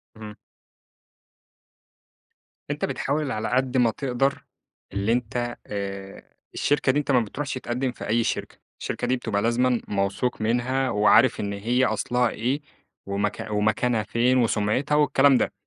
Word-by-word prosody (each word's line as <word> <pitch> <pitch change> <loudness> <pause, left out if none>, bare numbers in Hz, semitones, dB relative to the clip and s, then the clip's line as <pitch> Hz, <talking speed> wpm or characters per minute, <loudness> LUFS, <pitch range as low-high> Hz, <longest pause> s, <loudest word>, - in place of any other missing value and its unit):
امم. 105 -1 -9 2.4
أنت - - -1
بتحاول 145 0 -2
على 110 +1 -2
قد 130 0 +1
ما 120 -3 +4
تقدَر 135 +1 -1 0.5
اللي 100 +3 0
أنت 120 0 -1
آآ، 100 -1 -6 0.3
الشركة 145 -2 +2
دي 145 - +1
أنت 145 - -1
ما 125 - +5
بتروحش 135 +6 -4
تقدّم 125 0 -2
في - - -8
أي 115 +2 +2
شركة. - - -3 0.2
الشركة 125 - -3
دي 130 - +2
بتبقى 105 -4 -2
لازمًا 120 +1 +2
موثوق 100 +4 -1
منها، 125 +4 0
وعارف 105 -2 +4
إن 100 0 -2
هي 120 +6 +1
أصلها 120 +2 +1
إيه 130 +8 -2 0.4
وم 100 +1 0 0.2
ومكانها 110 +2 +1
فين 120 +4 +2
وسُمعِتها 115 +5 +1
والكلام 140 -2 +4
ده. - - 0
120 Hz, 140 wpm, -25 LUFS, 105-130 Hz, 2.4 s, ما